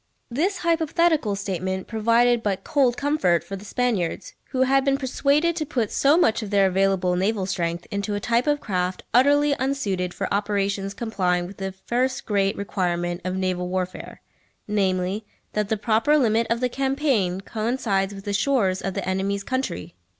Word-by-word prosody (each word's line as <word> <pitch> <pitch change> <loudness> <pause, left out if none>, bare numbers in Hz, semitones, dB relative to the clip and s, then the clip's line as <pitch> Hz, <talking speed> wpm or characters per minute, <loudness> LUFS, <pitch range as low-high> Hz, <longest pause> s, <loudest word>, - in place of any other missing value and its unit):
This 350 +11 0
hypothetical 325 - +1
statement 190 -1 -3
provided 235 +2 +2
but 200 -4 -2
cold 260 -4 +2
comfort 280 - +1
for 195 - -6
the 195 - -9
Spaniards, 210 -6 -1
who 260 0 0
had 270 +1 +3
been 275 0 +2
persuaded 285 +5 +1
to 315 - 0
put 245 -8 -2
so 285 +3 +4
much 230 -9 +3
of 215 - -5
their 200 -1 +4
available 190 -1 +2
naval 195 +2 0
strength 170 -2 -2
into 200 +1 -2
a - - -1
type 235 +5 +1
of 295 0 +2
craft 180 -6 -2
utterly 285 +3 +4
unsuited 205 -10 -1
for - - -3
operations 200 -1 -1
complying 180 -6 0
with 190 +2 -10
the 195 0 -3
first 255 +2 0
great 200 -2 +1
requirement 175 -3 -2
of 185 +1 -2
naval 185 -1 -1
warfare, 185 0 -4 0.5
namely, 195 0 0 0.3
that 210 -1 -1
the 220 - +1
proper 225 +8 +2
limit 230 -4 +2
of 230 +1 0
the 250 - +2
campaign 265 -9 0
coincides 215 -2 -1
with 195 -1 -10
the 205 - -2
shores 200 -5 +1
of 195 - -3
the - - -3
enemy's 195 +1 -1
country. 260 - -3
205 Hz, 170 wpm, -24 LUFS, 190-260 Hz, 0.5 s, so